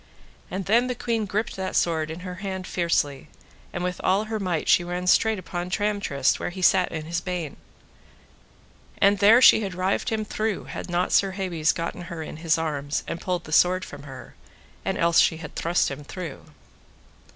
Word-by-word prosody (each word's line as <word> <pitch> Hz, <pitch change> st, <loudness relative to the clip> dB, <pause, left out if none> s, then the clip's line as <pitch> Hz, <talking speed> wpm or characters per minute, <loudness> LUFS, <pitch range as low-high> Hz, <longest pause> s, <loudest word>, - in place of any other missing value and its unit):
And 190 Hz, 0 st, -4 dB
then 235 Hz, +4 st, +3 dB
the 250 Hz, -, -2 dB
queen 225 Hz, -3 st, -1 dB
gripped 215 Hz, +4 st, -2 dB
that 190 Hz, 0 st, -3 dB
sword 160 Hz, -2 st, +1 dB
in 160 Hz, +3 st, -6 dB
her 180 Hz, 0 st, -6 dB
hand 190 Hz, -2 st, -4 dB
fiercely, 160 Hz, -7 st, -1 dB, 0.4 s
and 175 Hz, -, -4 dB
with 180 Hz, 0 st, -3 dB
all 195 Hz, +3 st, +3 dB
her 220 Hz, 0 st, -3 dB
might 180 Hz, -5 st, -2 dB
she 175 Hz, -, +5 dB
ran 180 Hz, +1 st, -4 dB
straight 220 Hz, +4 st, +4 dB
upon 175 Hz, -1 st, -5 dB
Tramtrist 200 Hz, -10 st, 0 dB
where -, -, -2 dB
he 185 Hz, +1 st, -7 dB
sat 185 Hz, 0 st, +4 dB
in 155 Hz, -1 st, -5 dB
his 170 Hz, +2 st, -2 dB
bain, 175 Hz, -5 st, -4 dB, 1.4 s
and 200 Hz, 0 st, +4 dB
there 225 Hz, +5 st, +7 dB
she -, -, +8 dB
had 195 Hz, -3 st, -4 dB
rived 185 Hz, +2 st, 0 dB
him 220 Hz, -1 st, -1 dB
through 215 Hz, 0 st, -2 dB
had -, -, -7 dB
not 175 Hz, +1 st, 0 dB
Sir 195 Hz, -1 st, +3 dB
Hebes 175 Hz, -5 st, 0 dB
gotten 165 Hz, +1 st, -4 dB
her 165 Hz, -3 st, -5 dB
in 155 Hz, -, -8 dB
his 160 Hz, 0 st, +1 dB
arms, 150 Hz, -3 st, -2 dB
and 165 Hz, -, -4 dB
pulled 180 Hz, -1 st, -2 dB
the -, -, -11 dB
sword 185 Hz, +3 st, +4 dB
from 145 Hz, -, -10 dB
her, 135 Hz, -2 st, -11 dB, 0.5 s
and -, -, -1 dB
else 170 Hz, 0 st, +4 dB
she 160 Hz, -, +4 dB
had 155 Hz, -2 st, -9 dB
thrust 170 Hz, -3 st, +1 dB
him 140 Hz, +2 st, -7 dB
through. 165 Hz, -1 st, -7 dB
180 Hz, 195 wpm, -25 LUFS, 165-195 Hz, 1.4 s, she